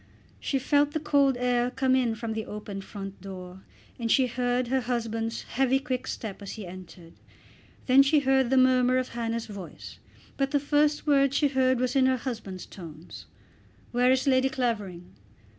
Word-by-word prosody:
She 275 - -1
felt 290 +2 +2
the 315 - 0
cold 280 -3 +2
air 245 0 +1
come 260 0 +1
in 240 -3 +1
from 225 0 -4
the 220 0 -4
opened 205 -2 -7
front 195 -1 -8
door, 185 -1 -9 0.4
and 230 -1 -1
she 265 - +4
heard 245 0 -1
her 265 0 +1
husband's 230 -1 -3
heavy 265 +1 +1
quick 260 -2 -3
step 210 -4 -6
as 200 - -7
he 215 -3 -7
entered. 175 -2 -11 0.7
Then 260 +1 +6
she 285 +2 +3
heard 265 -2 +2
the 265 - +3
murmur 255 0 +4
of 255 -1 -1
Hannah's 230 -1 -3
voice; 200 -5 -10 0.4
but 275 -1 +1
the 285 - +1
first 295 +1 +1
word 275 -2 +3
she 290 -1 +3
heard 260 -2 +2
was 255 +1 -1
in 260 -1 +4
her 260 0 +2
husband's 225 -7 -6
tones, 165 -3 -11 0.6
"Where 245 +1 +3
is 260 0 +2
Lady 265 -1 +3
Clavering?" 210 -9 -3
250 Hz, 175 wpm, -27 LUFS, 220-265 Hz, 0.7 s, Then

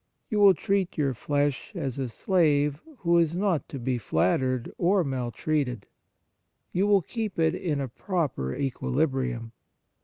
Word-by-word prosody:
You 210 - +1
will 200 -2 +7
treat 195 +2 -1
your 140 -3 +1
flesh 145 +2 -1
as 135 -1 -3
a 130 -2 -2
slave 150 - +2 0.2
who 170 -1 +4
is 165 0 +1
not 185 -4 0
to 140 - -6
be 125 0 -1
flattered 120 +8 0
or 185 +2 +3
maltreated; 130 -2 -2 0.9
you 195 +3 +1
will 200 -3 +4
keep 220 +1 -4
it 160 -1 +3
in 155 -6 -2
a 135 - -2
proper 135 - -2
equilibrium. 130 -3 -1
145 Hz, 145 wpm, -27 LUFS, 130-175 Hz, 0.9 s, will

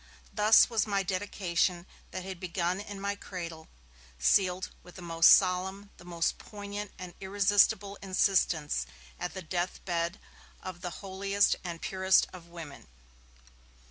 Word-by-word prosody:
Thus 215 +1 +6
was 225 -3 0
my 200 -1 +1
dedication, 180 -2 -1 0.2
that 185 - -6
had 190 -2 -6
begun 180 0 -1
in 205 -1 -7
my 200 +1 -1
cradle, 170 -5 -7 0.5
sealed 180 - +2
with 180 - -15
the 185 - -9
most 165 -1 +5
solemn, 190 +2 +3
the 175 - -15
most 170 -1 -1
poignant 205 -1 -7
and 180 -2 -8
irresistible 200 +1 +2
insistence, 175 - +1 0.3
at 180 - -4
the 190 - -6
death 175 +2 -2
bed 170 +1 -1 0.4
of 185 -2 -7
the 180 - -3 0.2
holiest 195 +1 +2
and 170 -2 -6
purest 190 0 +3
of 175 -2 -11
women. 165 -4 -10
185 Hz, 140 wpm, -30 LUFS, 175-200 Hz, 0.5 s, Thus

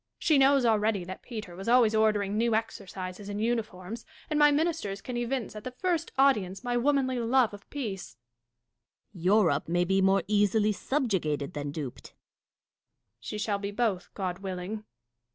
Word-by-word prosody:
She 305 -4 +3
knows 270 -1 +5
already 215 -3 +2
that 185 +2 -8
Peter 215 -7 -7
was 195 +5 -5
always 240 -3 +5
ordering 210 -2 +2
new 230 0 +2
exercises 195 -2 -5
and 205 0 -4
uniforms; 225 -2 -3 0.3
and 300 - +2
my 295 0 +7
ministers 295 - 0
can 250 +4 -6
evince 240 -2 -2
at 210 - -7
the - - -4
first 355 -4 -1
audience 215 -8 +2
my 245 -1 -1
womanly 260 0 +1
love 240 -1 +2
of 205 0 -12
peace 205 - -5 1.0
Dashkof. 170 - -10
Europe 180 -7 +3
may 175 +1 +2
be 190 +2 +2
more 195 -1 +3
easily 210 +1 +3
subjugated 190 - -1
than 145 -1 -4
duped. 140 -4 -6
Catharine. - - -44 1.0
She 125 - -6
shall 205 -1 -1
be 200 0 -3
both, 205 -4 -1
God 185 -2 -3
willing. 195 +3 -5
210 Hz, 165 wpm, -28 LUFS, 190-240 Hz, 1.0 s, my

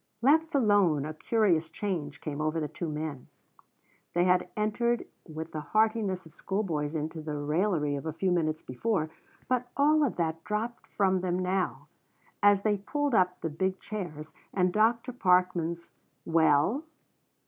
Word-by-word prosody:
Left 315 +4 +4
alone 200 - +3
a 155 - -4
curious 170 -2 +1
change 160 -5 -4
came 150 -1 -4
over 155 +1 0
the 150 - -2
two 170 +2 -5
men. 150 -3 -5 0.9
They 175 - +4
had 180 0 +3
entered 235 +3 0 0.2
with 160 0 -6
the 155 - -4
heartiness 215 +2 +1
of 160 - -15
schoolboys 165 -7 -2
into 160 +1 -3
the 150 -1 -4
raillery 150 0 0
of 140 +3 -5
a - - -1
few 185 +4 0
minutes 155 -3 0
before, 155 - -1 0.4
but 250 -1 0
all 300 +2 +4
of 275 - 0
that 165 -1 -2
dropped 225 +3 -3
from 190 -2 +1
them 180 -1 0
now, 185 0 -1 0.5
and 205 - +7
as 200 -1 0
they 210 -1 +2
pulled 290 +7 -2
up 180 -3 +2
the 165 - -2
big 190 +4 -1
chairs 165 -8 -6 0.2
and 180 -2 +2
Dr. 230 +3 +2
Parkman's 180 -5 +1 0.3
"Well?" 160 - +3
180 Hz, 160 wpm, -29 LUFS, 155-210 Hz, 0.9 s, and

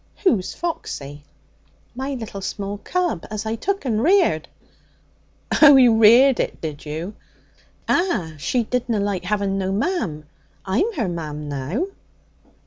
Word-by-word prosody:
'Who's 220 - +1
Foxy?' 145 - -5 0.7
'My 265 +2 -4
little 220 -5 -7
small 200 +1 -4
cub 350 - -2
as 215 0 -4
I 220 - -1
took 390 - -2
and 220 -4 0
reared.' 375 +7 +3 1.1
'Oh! 290 -2 +10
you 250 -4 +6
reared 240 +5 +6
it, - - -2
did 155 -3 -6
you?' 160 +7 -5 0.7
'Ah. 335 - 0
She 240 - 0
didna 235 -1 -1
like 200 -3 -2
having 200 0 0
no 190 0 -1
mam. 195 - -2 0.4
I'm 225 - +1
her 235 - -1
mam 150 -4 -5
now.' 145 - -2
215 Hz, 135 wpm, -22 LUFS, 180-265 Hz, 1.1 s, Oh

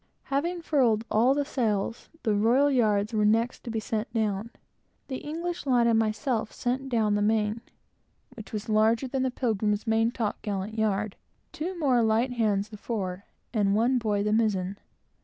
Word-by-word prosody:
Having 340 +5 -1
furled 235 -9 +2
all 245 +5 +4
the 285 0 0
sails, 225 -4 -2
the 220 -3 +2
royal 240 +8 +3
yards 215 -4 +2
were 215 -1 +2
next 225 +3 +1
to - - -6
be 225 -1 -1
sent 220 0 -3
down. 215 -1 -1 0.6
The 260 - -3
English 335 +2 -5
lad 245 -3 +4
and 230 -1 +4
myself 220 +1 -1
sent 260 +2 -2
down 220 -4 +2
the 205 - +1
main, 215 +1 +1 0.7
which 220 - -10
was 210 -1 -4
larger 220 +4 +3
than 265 +1 -2
the 260 - +1
Pilgrim's 215 -4 -1
main 225 0 +2
top 230 -3 -3
gallant 205 +1 -3
yard; 215 -2 -1 0.3
two 350 +2 -4
more 265 -7 +3
light 225 +3 +2
hands, 215 -4 0
the 215 - -9
fore; 200 -4 -4 0.3
and 200 -3 +2
one 245 +4 +3
boy, 210 -3 0
the 210 0 +1
mizen. 200 -4 +1
225 Hz, 175 wpm, -27 LUFS, 210-250 Hz, 0.7 s, all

